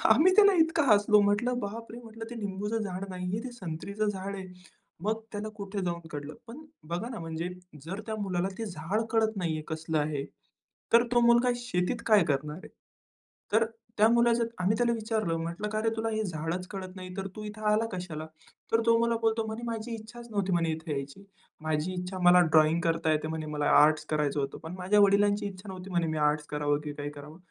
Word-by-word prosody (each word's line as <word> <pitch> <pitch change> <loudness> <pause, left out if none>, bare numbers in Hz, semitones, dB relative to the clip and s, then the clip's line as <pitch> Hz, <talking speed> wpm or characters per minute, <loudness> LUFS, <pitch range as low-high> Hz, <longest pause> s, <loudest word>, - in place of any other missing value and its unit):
आम्ही 370 +4 +6
त्याला 405 -1 +8
इतकं 320 -1 +3
हसलो 205 0 +5
म्हंटलं 220 +5 +2
"बापरे!" 230 +3 -6
म्हंटलं, 225 0 -9
"ते - - -6
निंबूचं 210 +1 -2
झाड 190 -1 -4
नाही 180 0 -5
आहे, 220 +3 -2
ते 255 - -5
संत्रीचं 200 +1 -3
झाड 200 0 -3
आहे." 190 -1 -7 0.6
मग 220 +1 0
त्याला 210 +1 -4
कुठे 200 0 -4
जाऊन 170 -2 -3
कळलं. 145 +1 -6
पण 275 +7 -10 0.2
बघा 175 +8 -3
ना, 240 - -6
म्हणजे 165 +1 -4 0.4
जर 190 +5 -5
त्या 220 -1 -3
मुलाला 185 -1 -1
ते 225 - -3
झाड 175 +6 -2
कळत 220 -1 +2
नाही 170 -4 -1
आहे 155 - -5
कसलं 160 0 -2
आहे, 145 -2 -1 0.7
तर 235 +1 +8
तो 240 - +5
मुलगा 240 +1 +5
शेतीत 240 -1 -1
काय 210 -5 +6
करणार 150 +2 -2
आहे. - - -9 0.9
तर 225 +1 +5 0.3
त्या 215 +1 +6
मुलाचं 235 0 +4
आम्ही 195 +4 +2
त्याला 240 -1 +2
विचारलं 215 -6 -1
म्हंटलं, 170 +6 -3
"का 215 0 -1
रे 225 - +3
तुला 225 0 0
हे 220 0 -1
झाडच 175 0 -3
कळत 190 -2 -7
नाही, 185 0 -8
तर 195 0 -2
तू 215 - -6
इथे 210 +1 -8
आला 220 +2 +3
कशाला?" 170 -4 -5 0.5
तर 225 0 +4
तो 230 0 +5
मला 235 0 +2
बोलतो 225 0 +1
म्हणे, 220 +2 -5
"माझी 230 0 -4
इच्छाच 235 +2 -10
नव्हती," 195 -2 0
म्हणे, 165 -1 +2
"इथे 160 0 -5
यायची." 140 +7 -5 0.4
"माझी 155 +3 -1
इच्छा 180 +1 -4
मला 180 0 +8
ड्रॉइंग 155 +1 +5
करता 165 -1 +1
येते 155 0 0
म्हणे, 160 -1 -4
मला 145 0 -1 0.2
आर्ट्स 155 +1 +4
करायचं 150 -2 0
होतं." 135 - -3
"पण 165 +3 -6
माझ्या 190 +3 +3
वडिलांची 205 +1 +4
इच्छा 195 +1 -10
नव्हती 185 0 -8
म्हणे 170 -2 +1
मी 155 0 -2
आर्ट्स 150 0 -2
करावं 145 0 +1
की 145 - -4
काय 145 0 -5
करावं. 145 +2 -11
195 Hz, 205 wpm, -29 LUFS, 165-220 Hz, 0.9 s, त्याला